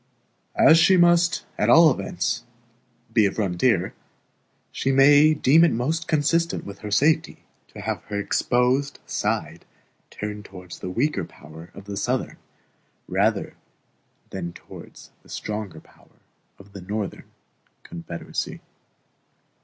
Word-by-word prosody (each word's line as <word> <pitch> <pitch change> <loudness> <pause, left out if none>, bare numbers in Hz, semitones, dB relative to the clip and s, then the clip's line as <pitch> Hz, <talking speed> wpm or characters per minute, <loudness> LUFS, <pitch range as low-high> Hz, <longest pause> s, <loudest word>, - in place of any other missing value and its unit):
As 160 +1 +7
she 185 +3 +5
must 175 0 +3
at - - +2
all 165 -1 +7
events 120 - -3 0.7
be 110 -4 +4
a - - -2
frontier, 95 0 0 0.8
she 135 - -1
may 145 +3 +6
deem 150 +4 +5
it 170 - +4
most 155 +9 -2
consistent 165 +2 0
with 100 0 -9
her 105 - -7
safety 145 +10 +1 0.2
to - - -11
have - - -3
her 100 -1 -4
exposed 125 +7 0
side - - -3 0.5
turned 105 0 -6
towards 90 -3 -11
the 90 - -5
weaker 135 +11 -1
power 80 +3 -13
of 100 - -11
the 100 0 -6
Southern, - - -2 0.7
rather - - 0 0.8
than 85 0 -5
towards - - -13
the - - -22
stronger 105 -6 -5
power - - -24 0.4
of 100 0 -17
the 100 - -9
Northern, 100 +2 -5 0.5
Confederacy. 85 0 -6
115 Hz, 125 wpm, -23 LUFS, 100-155 Hz, 0.8 s, As